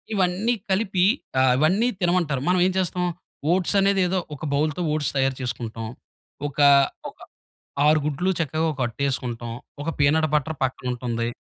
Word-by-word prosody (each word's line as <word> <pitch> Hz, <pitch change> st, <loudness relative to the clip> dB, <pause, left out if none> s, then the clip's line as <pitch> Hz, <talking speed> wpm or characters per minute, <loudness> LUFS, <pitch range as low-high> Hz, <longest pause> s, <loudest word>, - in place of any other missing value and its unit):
ఇవన్నీ 190 Hz, +5 st, +1 dB, 0.2 s
కలిపి 190 Hz, -2 st, +2 dB, 0.4 s
ఆహ్, 130 Hz, -1 st, +4 dB
ఇవన్నీ 190 Hz, +10 st, +3 dB
తినమంటారు. 170 Hz, -7 st, +1 dB
మనం 180 Hz, 0 st, +3 dB
ఏం -, -, 0 dB
చేస్తాం, 180 Hz, 0 st, -1 dB, 0.5 s
ఓట్సనేది 195 Hz, +1 st, +2 dB
ఏదో 185 Hz, +1 st, 0 dB, 0.2 s
ఒక 150 Hz, -, -7 dB
బౌల్‌తో 155 Hz, +3 st, 0 dB
ఓట్స్ 150 Hz, -2 st, -1 dB
తయారు 135 Hz, -1 st, +1 dB
చేసుకుంటాం. 115 Hz, -2 st, -4 dB, 0.6 s
ఒక, 145 Hz, -, -17 dB, 0.5 s
ఒక -, -, -19 dB, 0.7 s
6 155 Hz, 0 st, +5 dB
గుడ్లు 150 Hz, +6 st, -1 dB
చక్కగా 160 Hz, +1 st, 0 dB
ఒక 130 Hz, -, -14 dB
అట్టేసుకుంటాం. 120 Hz, -2 st, -3 dB, 0.3 s
ఒక 165 Hz, -, -2 dB
పీనట్ 155 Hz, +2 st, +3 dB
బటర్ 150 Hz, 0 st, -1 dB
పక్కనుంటుంది. 120 Hz, -2 st, -3 dB
155 Hz, 135 wpm, -24 LUFS, 130-180 Hz, 0.7 s, 6